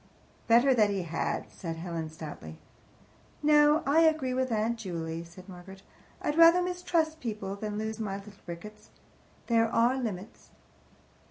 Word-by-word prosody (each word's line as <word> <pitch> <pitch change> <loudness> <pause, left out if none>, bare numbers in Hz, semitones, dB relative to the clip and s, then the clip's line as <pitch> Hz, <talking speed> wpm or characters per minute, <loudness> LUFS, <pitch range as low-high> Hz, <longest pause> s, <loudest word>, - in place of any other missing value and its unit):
"Better 240 +4 +5
that 215 -4 +3
he 195 -2 -2
had," 165 -1 -3
said 165 -3 -6
Helen 165 -1 -5
stoutly. 150 - -9 0.9
"No, 300 +1 +5
I 285 +4 +4
agree 315 -6 +3
with 260 0 -1
Aunt 225 +1 0
Juley," 165 -4 -4
said 175 +3 -14
Margaret. 190 +1 -12 0.4
"I'd 295 +2 -1
rather 335 +2 +7
mistrust 340 -3 -1
people 210 -6 -4
than 210 0 -5
lose 220 +1 -4
my 200 -3 -3
little 200 +1 -12
Ricketts. 210 +5 -9 0.6
There 230 -1 +3
are 240 +4 +2
limits." 205 -3 -6
215 Hz, 145 wpm, -29 LUFS, 180-265 Hz, 0.9 s, rather